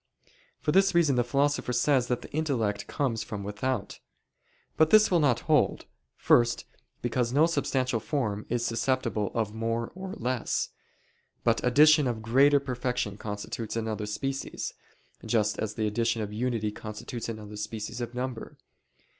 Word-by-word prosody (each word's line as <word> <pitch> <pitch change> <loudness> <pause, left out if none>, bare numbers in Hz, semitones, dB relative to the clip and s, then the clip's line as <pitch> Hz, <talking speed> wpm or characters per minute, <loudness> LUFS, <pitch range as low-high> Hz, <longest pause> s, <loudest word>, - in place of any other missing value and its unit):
For 150 - 0
this 195 +2 +4
reason 160 -6 +4
the 120 - +3
Philosopher 140 +2 +1
says 125 0 +2
that 125 -1 -1
the - - -11
intellect 115 -10 -1
comes 120 -6 -1
from 105 -2 -5
without. 105 +1 -3 0.8
But 155 0 +4
this 215 +1 +6
will 175 - +4
not 145 -6 +2
hold. - - +2 0.3
First, 120 0 +3 0.4
because 120 0 0
no 145 +5 +5
substantial 130 -7 0
form 110 -6 -2
is 120 0 0
susceptible 115 -4 0
of 110 -3 -1
more 115 +1 -2
or 190 +1 -7
less; 125 0 -1 0.7
but - - +2
addition 150 +3 +6
of 115 -3 -3
greater 140 +5 +5
perfection 125 -5 -2
constitutes 105 +2 -5
another 110 -2 -2
species, 135 +6 -3 0.5
just 105 -3 +1
as 105 -1 -3
the 110 - -1
addition 115 +1 0
of 105 0 -6
unity 115 -2 -1
constitutes 110 +3 -6
another 105 -2 -7
species 105 +3 -5
of 120 +1 -5
number. 125 -2 -5
120 Hz, 145 wpm, -28 LUFS, 110-135 Hz, 0.8 s, this